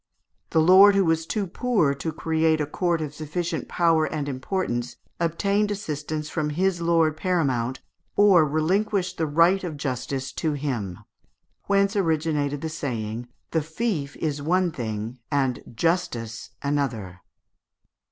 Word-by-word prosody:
The 160 - +2
lord 190 +4 +8
who 195 -1 +4
was 165 0 +1
too 210 -3 -1
poor 195 - +1
to 150 +4 -4
create 160 0 +1
a 150 - +1
court 170 +2 0
of 150 -2 -4
sufficient 160 +2 -3
power 165 -2 +3
and 150 -2 -3
importance 130 -3 -2 0.2
obtained 200 +5 +1
assistance 155 -6 -4
from 155 -1 -2
his 175 +3 0
lord 165 -2 +3
paramount 135 -9 0 0.3
or 200 -5 +6
relinquished 185 +6 0
the 160 - +1
right 170 +6 +4
of 165 -5 -4
justice 135 0 -3
to 155 -2 -1
him; 120 - -3 0.7
whence 200 0 +2
originated 155 -5 0
the 160 - -2
saying, 120 -6 -4 0.2
"The 160 - +1
fief 160 -3 -2
is 150 -3 -2
one 180 +3 +2
thing, 115 -2 -5
and 135 -4 0
justice 120 -8 -1
another." 120 -11 -2
155 Hz, 135 wpm, -25 LUFS, 140-175 Hz, 0.7 s, lord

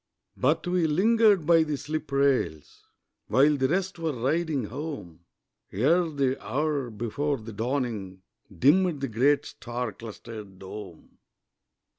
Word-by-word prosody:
But 145 +5 +1
we 175 -2 +1
lingered 205 +2 +4
by 165 0 +6
the 150 -2 -1
slip 155 +2 -5
rails 135 - 0 0.4
While 145 +3 +4
the 135 -2 +1
rest 185 +3 -1
were 165 -2 -1
riding 140 +3 0
home, 105 - -7 0.5
Ere 165 - +2
the 135 -3 -1
hour 145 -2 -1
before 120 +7 -2
the 110 0 -9
dawning, 110 -6 -3 0.3
Dimmed 155 - +3
the 135 - -1
great 140 +5 +2
star 120 -1 -5
clustered 110 -3 -10
dome. 95 -2 -10
140 Hz, 125 wpm, -27 LUFS, 115-155 Hz, 0.5 s, by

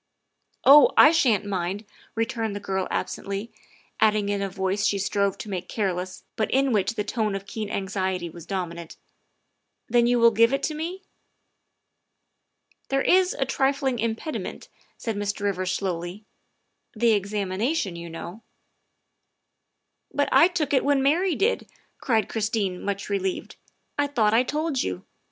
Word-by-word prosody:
Oh, 285 +2 +9
I 300 - +9
sha'n't 235 - +2
mind," 195 +1 -3 0.3
returned 225 -2 -2
the - - -3
girl 190 -2 -2
absently, 200 +3 -4 0.5
adding 210 -2 +3
in 200 -1 -1
a 195 - -1
voice 190 +1 -1
she 200 - +1
strove 200 0 0
to - - -8
make 185 -3 -5
careless 185 -3 -3
but 220 - -1
in 270 0 +2
which 210 +1 +1
the 210 - -2
note 215 -4 0
of 195 0 -5
keen 210 0 -5
anxiety 190 -3 -2
was 170 0 -11
dominant, 170 -4 -5 0.3
' - - -49
' - - -53
then 240 0 +3
you 245 0 +3
will 235 0 +6
give 230 +3 +4
it 275 - -1
to 310 - 0
me?" 340 +5 -5 1.3
" - - -43
There 270 0 +1
is 370 0 +3
a 270 - 0
trifling 270 -1 0
impediment," 230 +7 -4 0.3
said 225 -2 -3
Mr. 205 0 -3
Rivers 185 -2 -1
slowly, 185 +1 -3 0.3
" - - -42
the 230 +1 +3
examination, 200 - -1
you 170 0 -7
know." 170 +5 -8 0.8
" - - -54
But 285 - +1
I 335 - +7
took 315 -6 -2
it 265 - +3
when 280 -1 +2
Mary 335 +5 +2
did," 440 +9 0 0.3
cried 225 -5 +1
Christine, 210 -4 -1
much 200 0 -3
relieved. 195 -2 -2 0.2
" - - -19
I 290 - +3
thought 225 -7 +2
that 225 - +5
I - - +5
told 295 +1 -1
you. 90 0 -4
210 Hz, 165 wpm, -25 LUFS, 195-260 Hz, 1.3 s, Oh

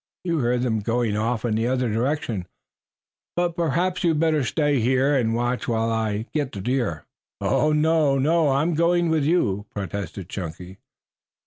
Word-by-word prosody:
You 170 -3 0
heard 125 -1 +1
them 115 -3 0
going 115 0 0
off 115 +2 -1
in 115 - 0
the 115 +2 0
other 125 0 0
direction, 115 - -1 0.9
but 175 -1 0
perhaps 170 +3 0
you 170 - +4
had 155 -2 +1
better 155 -3 +2
stay 145 +2 +1
here 130 +4 +2
and 115 -4 +1
watch 120 +1 -1
while 115 -1 0
I 110 -1 -1
get 145 -4 -1
the 100 - -5
deer." 115 - -1 0.3
"No, 155 - +2
no, 155 0 +3
I'm 145 +6 +1
going 170 +1 +2
with 155 -3 +1
you," 105 - +1
protested 100 -2 -5
Chunky. 90 0 -7
125 Hz, 160 wpm, -24 LUFS, 110-155 Hz, 0.9 s, you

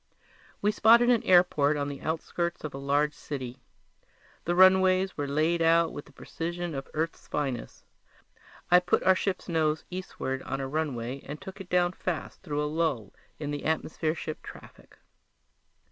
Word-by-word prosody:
We 210 - +4
spotted 235 +3 +6
an 235 -2 +3
airport 175 -8 +4
on 145 -1 -1
the 140 -1 -6
outskirts 170 +2 -3
of 155 - -5
a 135 - -6
large 145 +2 +1
city. 130 -4 -6 0.9
The 175 - 0
runways 185 0 +5
were 145 -1 -3
laid 155 +4 +1
out 165 0 +4
with 145 - -7
the - - -18
precision 170 +4 -5
of 135 -1 -5
Earth's 160 +2 -3
finest. 135 -5 -4 0.9
I 180 - +8
put 180 0 +1
our 190 - +6
ship's 185 0 -2
nose 160 -3 0
eastward 155 -7 -4
on 135 - -4
a 135 - -3
runway 135 -3 -3
and 150 +2 -7
took 190 +1 -9
it 185 - -11
down 175 -1 +3
fast 180 -3 -5
through 150 -5 -2
a - - 0
lull 150 -8 -1 0.2
in 145 -1 -4
the 145 - -4
atmosphere 160 0 -1
ship 155 -1 -6
traffic. - - -13
160 Hz, 165 wpm, -28 LUFS, 145-180 Hz, 0.9 s, I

